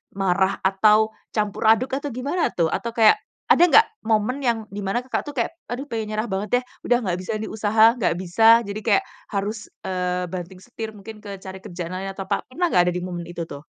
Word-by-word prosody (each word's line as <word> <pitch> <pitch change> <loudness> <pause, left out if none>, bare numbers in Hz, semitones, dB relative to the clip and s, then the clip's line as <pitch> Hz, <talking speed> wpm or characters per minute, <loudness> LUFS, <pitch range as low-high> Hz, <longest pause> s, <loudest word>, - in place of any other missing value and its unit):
marah, 190 0 +1
atau 210 +3 +4 0.2
campur 210 0 0
aduk, 225 +4 +4
atau 290 - -5
gimana 285 +8 0
tuh? 165 -2 +1
Atau 235 0 -3
kayak 230 - +6 0.3
ada - - +6
nggak 440 +6 +7 0.2
momen 225 +5 0
yang 235 -2 +2
di 205 -1 -7
mana, 195 +5 0
Kakak, 255 +1 -3
tuh 290 - -7
kayak 265 +5 -2 0.2
aduh 270 +4 -4
pengen 220 -3 -4
nyerah 215 +2 -1
banget 195 +1 -3
deh - - -11 0.2
udah 245 - +3
nggak 185 -7 -1
bisa 185 - -5
nih 220 - -4
usaha, 220 +2 +4
nggak 205 -8 0
bisa 225 +6 +5
jadi 200 +1 -4
kayak 205 -3 +3 0.3
harus, 205 +2 -2 0.3
eee, 180 -1 -1
banting 180 +1 -7
setir 225 +1 -7
mungkin 215 +1 -11
ke 200 -2 -7
cari 190 0 -9
kerjaan 175 0 -6
lain 195 +1 -4
atau 195 0 -7
apa, - - -1
pernah 345 +8 -1
nggak 180 - +4
ada - - -5
di 180 - -1
momen 175 -1 -5
itu 170 -1 -6
tuh? 145 0 -10
210 Hz, 220 wpm, -23 LUFS, 185-230 Hz, 0.3 s, nggak